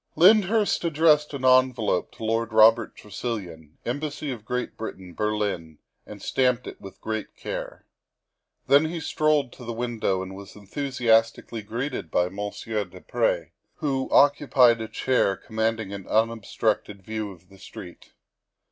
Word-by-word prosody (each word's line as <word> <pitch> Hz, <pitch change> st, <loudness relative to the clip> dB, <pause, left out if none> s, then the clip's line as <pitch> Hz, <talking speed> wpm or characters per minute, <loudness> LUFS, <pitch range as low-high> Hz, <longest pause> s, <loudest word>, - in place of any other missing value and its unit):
Lyndhurst 205 Hz, +3 st, +4 dB
addressed 155 Hz, -2 st, +3 dB
an 130 Hz, -2 st, -4 dB
envelope 130 Hz, -7 st, +3 dB
to -, -, -10 dB
Lord 115 Hz, 0 st, -1 dB
Robert 110 Hz, +1 st, +5 dB
Tresilian, 95 Hz, -8 st, -6 dB
Embassy 145 Hz, +3 st, -3 dB
of 110 Hz, -4 st, -7 dB
Great 125 Hz, 0 st, -3 dB
Britain, 95 Hz, -5 st, -7 dB
Berlin, 100 Hz, -7 st, -2 dB, 0.3 s
and 105 Hz, -2 st, -10 dB
stamped 125 Hz, -1 st, +1 dB
it -, -, -9 dB
with 95 Hz, -1 st, -11 dB
great 110 Hz, -1 st, -4 dB
care. -, -, -6 dB, 0.8 s
Then 140 Hz, +3 st, +5 dB
he 165 Hz, +1 st, -3 dB
strolled 150 Hz, -4 st, +1 dB
to 125 Hz, -, -12 dB
the 120 Hz, -, -5 dB
window 115 Hz, -5 st, -1 dB
and 95 Hz, 0 st, -8 dB
was 100 Hz, -1 st, -11 dB
enthusiastically 115 Hz, 0 st, 0 dB
greeted 115 Hz, -, -4 dB
by 90 Hz, +2 st, +1 dB
Monsieur 105 Hz, +2 st, -3 dB
du 90 Hz, -1 st, -13 dB
Pre, -, -, -1 dB, 0.2 s
who 135 Hz, -4 st, -2 dB
occupied 135 Hz, -5 st, +5 dB
a 110 Hz, -, -4 dB
chair 110 Hz, -6 st, +1 dB
commanding 110 Hz, -2 st, -2 dB
an 100 Hz, -1 st, -7 dB
unob 110 Hz, -1 st, 0 dB
structed 105 Hz, -3 st, -1 dB
view 110 Hz, 0 st, -4 dB
of 90 Hz, -1 st, -17 dB
the 95 Hz, -1 st, -17 dB
street. 90 Hz, -2 st, -11 dB
115 Hz, 145 wpm, -25 LUFS, 100-130 Hz, 0.8 s, Robert